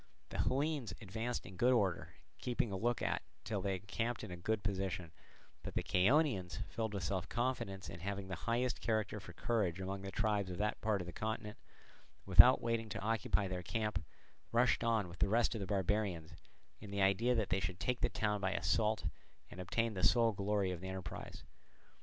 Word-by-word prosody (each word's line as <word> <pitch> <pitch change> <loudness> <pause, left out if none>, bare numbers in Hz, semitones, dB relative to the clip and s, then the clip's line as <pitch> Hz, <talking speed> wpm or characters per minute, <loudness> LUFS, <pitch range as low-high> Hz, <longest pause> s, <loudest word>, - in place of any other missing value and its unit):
The - - -5
Hellenes 135 -6 0
advanced 115 +4 -3
in 90 0 -10
good 125 +5 +4
order, 95 -8 0 0.2
keeping 120 -3 -1
a - - -2
look 120 +5 0
out - - 0 0.2
till 100 -3 -2
they 95 0 0
encamped 110 +5 -3
in - - -6
a - - -4
good 105 +5 -1
position; 95 -4 -2 0.5
but - - -7
the - - 0
Chaonians, 95 - +2
filled 110 +1 -3
with 95 - -2
self 90 +1 -2
confidence, 120 -7 -2
and 85 +1 -8
having 100 +1 -3
the 95 - -5 0.2
highest 120 +1 +1
character 110 -2 0
for 90 -2 -11
courage 95 -4 0
among 95 +1 -3
the 95 - -5
tribes 105 -2 0
of 90 - -5
that 105 +2 -1
part 105 -3 +1
of - - -5
the 90 - -7
continent, 110 -1 -4 0.7
without 100 +7 +8
waiting 115 -1 0
to - - -4
occupy 105 -1 +1
their 90 -1 -3
camp, 95 0 -2 0.5
rushed 120 0 +3
on 110 -4 +2
with 85 +1 -11
the 100 - +3
rest 115 +2 +3
of 110 - -4
the 95 - -3
barbarians, 95 -4 0 0.5
in 105 - -9
the 100 0 +1
idea 105 +6 +3
that 110 -4 0
they 95 - +2
should 90 0 -3
take 125 -1 -1
the - - +3
town 105 -1 0
by 95 0 +1
assault 110 +1 +1 0.5
and 90 - -7
obtain 115 +5 0
the 95 - -3
sole 115 +5 +5
glory 100 -1 0
of 90 -2 -5
the 95 - -5
enterprise. 95 -2 -6
100 Hz, 200 wpm, -36 LUFS, 95-115 Hz, 0.7 s, without